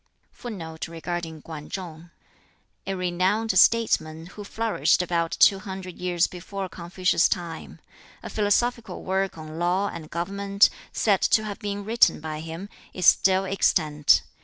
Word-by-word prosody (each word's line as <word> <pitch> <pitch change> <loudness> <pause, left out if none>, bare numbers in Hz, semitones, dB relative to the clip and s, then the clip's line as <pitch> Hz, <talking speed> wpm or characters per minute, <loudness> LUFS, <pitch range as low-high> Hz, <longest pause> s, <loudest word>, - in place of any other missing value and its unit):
] - - -41
[Footnote 165 -10 -7
9: 165 -1 -5 1.5
A 195 - -1
renowned 185 +5 0
statesman 160 -9 +3
who 200 +4 -10
flourished 220 -3 +1
about 170 +1 -1
two 195 - +6
hundred 190 -2 -8
years 180 -1 +1
before 190 +2 -6
Confucius's 175 0 +1
time. 170 -3 -4 0.5
A - - -6
philosophical 220 0 0
work 190 -1 -1
on 155 0 -8
law 185 +4 +1
and 155 -2 -8
government, 200 +4 +2 0.2
said 200 -4 +2
to 215 - +3
have 205 -2 -6
been 205 -1 -4
written 230 +2 +3
by 155 0 -5
him, 165 +4 -7 0.3
is 185 - -2
still 190 +1 +5
extant. 155 -6 +3
185 Hz, 135 wpm, -25 LUFS, 170-200 Hz, 1.5 s, two